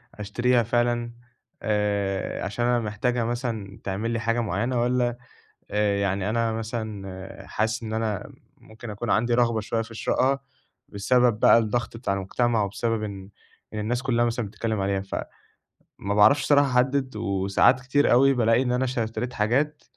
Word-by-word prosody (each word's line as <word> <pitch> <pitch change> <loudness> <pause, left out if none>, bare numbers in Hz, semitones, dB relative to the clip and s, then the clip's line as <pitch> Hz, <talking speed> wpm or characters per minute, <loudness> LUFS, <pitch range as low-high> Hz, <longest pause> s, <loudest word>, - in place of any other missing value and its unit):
أشتريها 120 +4 +1
فعلًا 120 0 0 0.5
آآ، 100 -2 -1
عشان 105 +5 -2
أنا 120 0 +2
محتاجها 115 +2 -1
مثلًا 115 -4 -4
تعمل 100 +4 -2
لي 115 - -1
حاجة 115 +1 0
معينة 120 +4 -1
والّا 120 0 +1 0.5
آآ، 105 -1 +1
يعني 100 0 0
أنا 115 0 +1
مثلًا 110 -4 -6
حاسس 110 +2 -1
إن 110 -1 -5
أنا 110 -3 -2 0.3
ممكن 110 +1 -11
أكون 105 +3 -5
عندي 120 +2 +2
رغبة 115 -2 +2
شوية 115 +2 -1
في 115 0 -9
شرائها، 135 +4 +1 0.5
بسبب 115 +2 +2
بقى - - +7
الضغط 115 +1 -1
بتاع 115 -4 -1
المجتمع 110 +4 0
وبسبب 110 +2 -2
إن 100 -2 -7 0.4
إن 105 - -3
الناس 120 +4 -1
كلها 120 -3 +2
مثلًا 115 -1 -2
بتتكلم 110 +1 -3
عليها، 95 0 0
فما 95 - -7 0.7
باعرفش 110 +8 +5
صراحة 145 -1 +4
أحدد 130 0 +1
وساعات 100 +4 +2
كتير 140 +3 +2
أوي 135 +3 +5
بالاقي 115 -1 +3
إن 125 -2 0
أنا 125 +1 +1
ش 130 -1 -2
اشتريت 115 +2 -3
حاجات 135 +8 0
115 Hz, 155 wpm, -25 LUFS, 105-120 Hz, 0.7 s, بقى